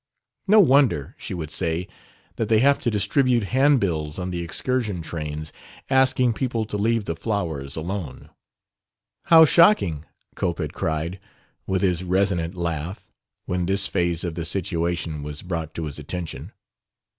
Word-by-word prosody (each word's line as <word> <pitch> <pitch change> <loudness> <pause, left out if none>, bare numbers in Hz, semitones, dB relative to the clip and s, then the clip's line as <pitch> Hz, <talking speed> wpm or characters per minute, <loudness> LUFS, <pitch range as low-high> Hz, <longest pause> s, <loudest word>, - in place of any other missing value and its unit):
"No 215 +2 +6
wonder," 135 - +4
she - - -5
would 80 -3 -5
say, 85 +1 -1 0.5
"that 115 - -1
they 110 - +5
have 140 +5 +4
to - - 0
distribute 120 +2 +2
handbills 100 - +2
on 90 0 -3
the 85 -1 -3
excursion 105 +1 -2
trains 75 -1 -5 0.4
asking 130 -2 +3
people 115 -2 -2
to 105 - -6
leave 115 0 +1
the 85 - -3
flowers 80 -8 -3
alone!" 80 -4 -5 0.9
"How 160 -1 +8
shocking!" 150 - +4 0.3
Cope 85 -2 -2
had 75 -4 -4
cried, 80 +4 -2 0.5
with 95 0 0
his 90 -2 +1
resonant 90 -2 0
laugh, 85 +1 -4 0.3
when 90 -1 -1
this 100 +1 +2
phase 85 -2 -1
of 85 -2 -3
the 85 +1 -4
situation 85 -3 -2
was 75 0 -7
brought 85 -3 -4
to 80 - -3
his 75 -1 -6
attention. 80 +2 -6
90 Hz, 145 wpm, -23 LUFS, 80-110 Hz, 0.9 s, How